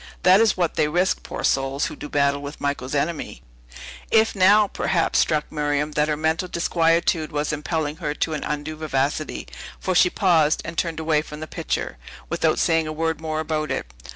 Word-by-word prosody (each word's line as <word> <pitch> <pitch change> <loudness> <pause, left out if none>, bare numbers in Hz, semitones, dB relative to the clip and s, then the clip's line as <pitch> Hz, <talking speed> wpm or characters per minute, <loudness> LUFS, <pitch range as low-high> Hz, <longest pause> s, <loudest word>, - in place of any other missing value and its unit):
That 185 +3 +6
is 225 -3 +3
what 175 -3 +1
they 150 - +3
risk, 175 +5 +1
poor - - -6
souls, 135 +1 +1
who - - -5
do 150 - -8
battle 140 0 +1
with 145 +1 -8
Michael's 140 -1 -2
enemy." 145 - -2 0.7
It 220 0 +4
now, 205 +2 +5
perhaps, 175 -3 0
struck 155 -1 +1
Miriam 150 0 -1
that 150 0 +1
her 150 -1 0
mental 160 +3 0
disquietude 165 -1 +1
was 150 +1 -1
impelling 150 0 -2
her 150 -4 -3
to 160 - -1
an 150 - -3
undue 150 +1 -4
vivacity; 150 0 -2 0.3
for 185 - -1
she 180 0 +5
paused, 165 -6 +2
and 170 - -6
turned 165 -1 -1
away 155 -1 +2
from 150 -1 -9
the 155 - -5
picture, - - -4 0.3
without - - +1
saying 165 -1 +2
a - - -3
word 160 0 -2
more 155 -1 -2
about 155 -1 -2
it. - - -4
155 Hz, 190 wpm, -23 LUFS, 150-165 Hz, 0.7 s, That